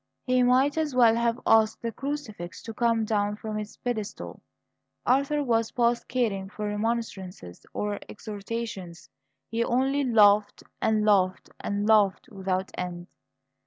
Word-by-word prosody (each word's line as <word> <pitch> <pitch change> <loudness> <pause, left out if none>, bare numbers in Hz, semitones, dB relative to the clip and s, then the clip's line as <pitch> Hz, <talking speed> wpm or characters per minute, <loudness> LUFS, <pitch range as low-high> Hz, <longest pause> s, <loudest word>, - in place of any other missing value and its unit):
He 255 0 +3
might 260 +5 +3
as 300 -4 -1
well 235 -3 +6
have 235 0 +1
asked 220 0 +3
the 230 - -1
crucifix 245 -11 -6
to 225 - -7
come 230 -1 +1
down 210 -1 0
from 215 0 -5
its 210 0 -8
pedestal. 220 -4 -5 0.6
Arthur 280 +3 +2
was 230 -3 +1
past 235 -1 +1
caring 215 -6 -1
for 210 +1 -5
remonstrances 205 - -4
or 205 -1 -3
exhortations; 205 -4 -6 0.4
he 230 +1 +1
only 270 +4 +1
laughed, 210 -4 +4 0.2
and 215 -1 +2
laughed, 190 -3 +2
and 205 0 -2
laughed 210 -3 +3
without 190 -1 -2
end. 175 0 -5
220 Hz, 135 wpm, -27 LUFS, 205-240 Hz, 0.6 s, well